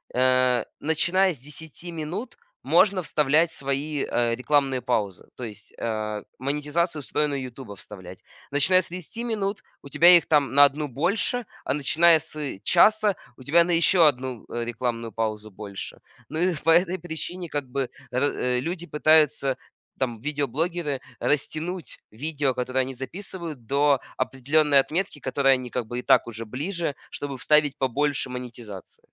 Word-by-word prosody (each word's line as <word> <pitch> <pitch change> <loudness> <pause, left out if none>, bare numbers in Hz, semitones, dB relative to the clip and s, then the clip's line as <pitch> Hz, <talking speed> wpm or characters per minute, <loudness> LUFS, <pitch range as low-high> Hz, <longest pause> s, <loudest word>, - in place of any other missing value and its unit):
э, 130 -1 +3 0.2
начиная 175 +4 +2
с - - -13
10 160 +4 -8
минут 170 +10 -5 0.3
можно 195 -3 +4
вставлять 155 +2 +2
свои, 140 +1 -2
э, 120 -1 0
рекламные 135 0 +1
паузы, 105 -7 -2
то 125 - -8
есть, 105 -2 -10
э, 110 -2 -3 0.2
монетизацию 150 +4 -1
встроенную 140 0 -1
"Ютуба" 125 -4 -8
вставлять. 95 -2 -11 0.3
Начиная 175 +6 +4
с - - -6
30 185 +7 -6
минут 210 -3 -2 0.2
у 140 - -12
тебя 170 +5 +4
их - - -1
там 145 -3 +2
на 145 0 +8
1 145 +2 -1
больше, 200 - 0 0.2
а - - 0
начиная 160 +3 +4
с 150 -8 -5
часа 210 +2 +4 0.2
у 130 - -13
тебя 170 +5 +5
на 175 - -2
еще 170 +1 +5
1 130 -4 -1
рекламную 115 -1 -3
паузу 110 -1 -3
больше. 100 0 -8 0.3
Ну 160 - -4
и 180 +1 +2
по 165 - +4
этой 175 +2 +3
причине 175 +2 -5
как 145 -2 -2
бы 130 0 -2 0.2
р 125 -1 0
люди 175 +4 -4
пытаются, 150 -3 +3 0.4
там 120 -4 -2
видеоблогеры, 150 +2 -2 0.2
растянуть 160 +5 -2
видео, 145 +3 -1
которое 130 +1 -1
они 130 +1 -6
записывают 155 - -7
до 140 +1 +3 0.2
определённой 140 +3 +2
отметки, 165 +3 -1
к - - -31
которой 135 0 +3
они 125 -1 -6
как 120 -2 -3
бы 120 +1 -4
и - - -4
так - - +4
уже 115 0 -6
ближе, 150 - -3
чтобы 140 -2 -5
вставить 150 +1 +3
побольше 135 +1 0
монетизации. 120 -6 -9
145 Hz, 150 wpm, -25 LUFS, 125-165 Hz, 0.4 s, на